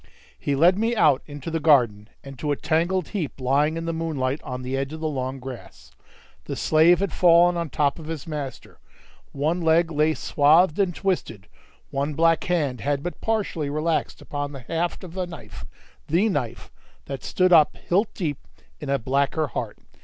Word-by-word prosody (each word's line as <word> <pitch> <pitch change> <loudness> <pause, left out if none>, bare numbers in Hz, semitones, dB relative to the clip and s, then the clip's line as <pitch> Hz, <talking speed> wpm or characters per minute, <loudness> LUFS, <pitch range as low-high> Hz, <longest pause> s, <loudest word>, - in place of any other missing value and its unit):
He 140 - -1
led 175 +7 +4
me 230 +2 +1
out 150 - +4
into 145 +2 -7
the 165 - -1
garden, 120 -9 +3
and 135 -2 -10
to 150 - -1
a - - +2
tangled 165 +4 0
heap 170 -10 -4
lying 145 +5 +1
in 165 - -4
the 165 - -2
moonlight, 150 -4 -2
on 125 0 -6
the 130 +1 -3
edge 135 +2 -3
of 160 - -6
the 160 - -2
long 130 -2 -3
grass. 130 -2 -10 0.5
The - - -4
slave 165 +4 +4
had 200 - -1
fallen 175 0 +5
on 170 -2 -2
top 145 +1 0
of 155 - -9
his 160 -4 -5
master; 145 -5 -7 0.5
one 155 +5 -1
leg 165 +1 +3
lay 155 +1 +2
swathed 155 +4 +3
and 185 -4 +1
twisted; 175 - -2 0.5
one 140 +2 -2
black 165 +1 +3
hand 150 -8 -1
had 145 0 -1
but 175 - -6
partially 200 -9 -1
relaxed 155 +3 -1
upon 145 0 -4
the 135 - -8
haft 165 +10 -3
of 175 -1 -10
a 185 -1 -1
knife 105 - -10 0.4
(the 180 +8 +2
knife) 125 - -3 0.3
that 135 -3 -6
stood 185 -1 +2
up 155 -3 +5
hilt 200 +5 0
deep 150 -8 -2 0.4
in 145 - -6
a 140 - +2
blacker 140 +4 0
heart. - - -5
155 Hz, 185 wpm, -24 LUFS, 140-170 Hz, 0.5 s, fallen